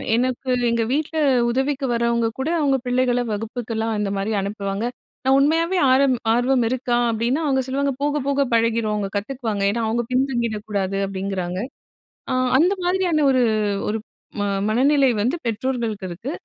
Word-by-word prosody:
எனக்கு 255 +1 -1 0.2
எங்க 230 -1 +1
வீட்ல 315 +2 -1 0.3
உதவிக்கு 270 +2 -1
வர்றவங்க 235 0 +1
கூட 285 +5 -1
அவுங்க 275 -3 +2
பிள்ளைகள 245 0 +2
வகுப்புக்கெல்லாம் 225 0 -3
இந்த 205 -1 -1
மாரி 200 +3 -2
அனுப்புவாங்க. 200 +1 -3 0.4
நான் 265 +1 +5
உண்மையாவே 330 +5 +2
ஆர்வ 275 +1 +5 0.3
ஆர்வம் 245 0 +2
இருக்கா? 245 -1 0
அப்டின்னா, 235 +7 0
அவுங்க 265 -1 +2
சொல்லுவாங்க 275 +1 0
போகப் 290 -2 0
போக 280 0 +1
பழகிரும், 230 -1 +2
அவுங்க 200 -2 -2
கத்துக்குவாங்க. 220 -3 -3
ஏன்னா 235 +2 -2
அவுங்க 240 +2 0
பின்தங்கிடக் 235 -5 -1
கூடாது 195 -1 -1
அப்டிங்கறாங்க. 190 -2 -3 0.7
அ, - - +1 0.3
அந்த 360 +5 +4
மாதிரியான 355 -5 +2
ஒரு 255 -1 +3 0.5
ஒரு 220 - -1 0.4
ம 205 - 0 0.3
மனநிலை 270 +3 +3
வந்து 245 +10 +1
பெற்றோர்களுக்கு 230 -3 -2
இருக்கு. 215 - -6
240 Hz, 145 wpm, -22 LUFS, 220-270 Hz, 0.7 s, நான்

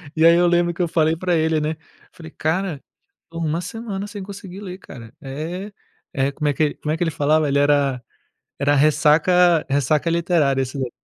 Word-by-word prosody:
E 160 +1 +3
aí 170 0 +7
eu 175 0 +4
lembro 175 0 +2
que 180 - -4
eu 175 - +1
falei 160 0 +1
para 180 +1 -1
ele, 160 0 +1
né, 155 +1 -2 0.4
falei: 160 -2 -12
"Cara, 165 -1 -2 0.4
estou 165 0 -8
uma 160 +2 -1
semana 205 0 -5
sem 205 -1 -7
conseguir 195 -1 -9
ler, 185 -2 -7
cara". 115 -8 -12
É. 165 +9 -6 0.4
Eh, 135 +1 +1
como 150 0 -2
é - - +1
que 155 - 0
ele 145 - +1
como 150 - -4
é - - -2
que 175 - 0
ele 165 - -1
falava? 150 +1 +2
Ele 140 0 +1
era 140 -3 +2 0.6
era 145 +1 +2
ressaca 155 +4 +4
ressaca 145 +4 +1
literária 165 -5 +1
esse 130 +1 -4
daí. 125 -2 -3
160 Hz, 205 wpm, -21 LUFS, 145-175 Hz, 0.6 s, aí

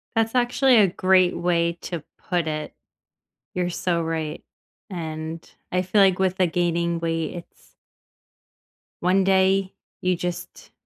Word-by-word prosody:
That's 225 +1 +1
actually 250 +1 +3
a 205 -3 +6
great 185 0 +3
way 170 -1 +1
to 170 -4 -5
put 175 -3 -2
it. 155 -1 -4 0.8
You're 180 -1 -1
so 175 -1 -1
right, 160 -1 -3 0.5
and 160 -2 -6 0.2
I 180 0 +1
feel 185 +3 +2
like 190 -2 +4
with 190 0 +1
the 185 - +3
gaining 170 0 0
weight, 165 -1 -2
it's 170 - -13 1.3
one 185 +2 +3
day, 190 0 +2 0.3
you 185 0 +1
just 175 0 -6
180 Hz, 135 wpm, -24 LUFS, 165-190 Hz, 1.3 s, a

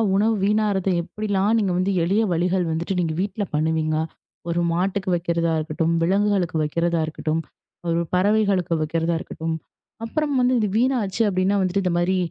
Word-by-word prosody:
உணவு 215 +3 +3
வீணாறத 205 -2 +1
எப்படிலாம் 205 +3 0
நீங்க 200 -4 +1
வந்து 185 +2 +1
எளிய 195 +6 +2
வழிகள் 180 +2 +1
வந்துட்டு, 170 +4 -2
நீங்க 165 -2 0
வீட்டுல 205 +1 -2
பண்ணுவீங்க. 155 0 +1 0.5
ஒரு 175 +1 0
மாட்டுக்கு 185 +2 -1
வைக்கிறதா 170 -1 0
இருக்கட்டும், 160 +2 -1
விலங்குகளுக்கு 195 -2 +1
வைக்கிறதா 170 +2 0
இருக்கட்டும், 155 0 -2 0.7
பறவைகளுக்கு 200 -2 +2
வைக்கிறதா 165 +2 0
இருக்கட்டும். 160 0 -4 0.5
அப்புறம் 295 +4 -1
வந்து 250 +1 +3
இது 210 - +1
வீணாச்சு 235 -4 +1
அப்படின்னா, 190 +1 +1
வந்துட்டு 190 +1 0
இந்த 180 -2 0
மாதிரி 185 +2 +1
185 Hz, 140 wpm, -23 LUFS, 165-205 Hz, 0.7 s, உணவு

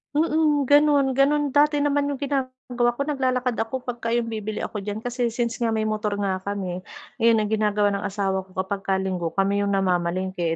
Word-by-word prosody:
Mm, 305 -2 +2
gano'n, 285 0 +4
gano'n 280 +2 +2
dati 295 0 +3
naman 285 0 +1
yung 285 - -2
ginagawa 255 -3 -1
ko. 280 - -1
Naglalakad 255 -4 -1
ako 235 +3 -3
pag 240 -2 -5
ka 230 - -3
yung 230 -1 -1
bibili 215 -1 -4
ako 210 - -4
diyan 205 +2 -5
kasi 245 0 -1
since 235 0 -2
nga 235 - +1
may 220 - 0
motor 215 -1 -1
nga 195 -2 -1
kami, 190 -2 -4 0.4
yun 230 0 +5
ang 210 - -4
ginagawa 210 -1 +2
ng 200 0 -2
asawa 195 -1 -1
ko 185 - -22
kapag 190 +1 -2
ka 190 - +2
linggo 185 -3 -2
kami 200 +1 +1
yung 200 -1 +1
namamalengke, 180 -2 0
225 Hz, 200 wpm, -24 LUFS, 200-265 Hz, 0.4 s, yun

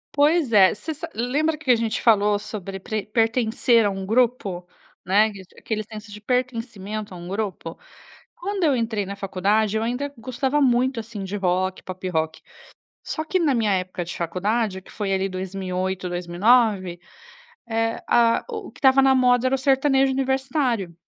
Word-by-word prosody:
Pois 295 -3 +3
é. 190 -3 +6
Você 315 +8 -5
sa 300 - -7
lembra 290 +7 0
que 285 -4 +1
a - - +6
gente 225 -1 -1
falou 210 -2 +4
sobre 195 -2 -7
pre 215 +2 -4
pertencer 225 +1 +2
a 205 - +2
um 195 -1 -5
grupo? 225 -5 +1 0.4
Né, 210 +4 +3
que 195 - -10
d 180 - -25
aquele 215 -1 -3
senso 215 0 -10
de 210 - -10
pertencimento 220 -4 -3
a - - -8
um 175 - -9
grupo? 195 -4 -4 0.6
Quando 395 +1 -3
eu 290 -4 +3
entrei 225 -4 -1
na 200 - -5
faculdade, 200 +2 0
eu 220 - -1
ainda 255 +5 -3
gostava 260 +4 -1
muito, 255 -1 +2
assim, 220 -3 -7
de 190 +2 -5
rock, 185 0 0
pop-rock, 175 -4 -3 0.6
só 315 - -3
que 370 +4 0
na 310 -5 +2
minha 220 -3 +1
época 185 -1 -2
de 175 - -6
faculdade, 190 +3 -1
que - - -17
foi 200 -2 -2
ali 195 0 0
2008, 185 0 -3
2009, 185 +1 +2 0.7
eh, 225 0 -1
a 230 -1 +3
o 435 -4 -6
que - - -18
estava 270 -1 +5
na 265 0 +5
moda 250 -1 +3
era 270 - 0
o - - -8
sertanejo 270 0 +3
universitário. 265 - -1
220 Hz, 175 wpm, -23 LUFS, 190-255 Hz, 0.7 s, é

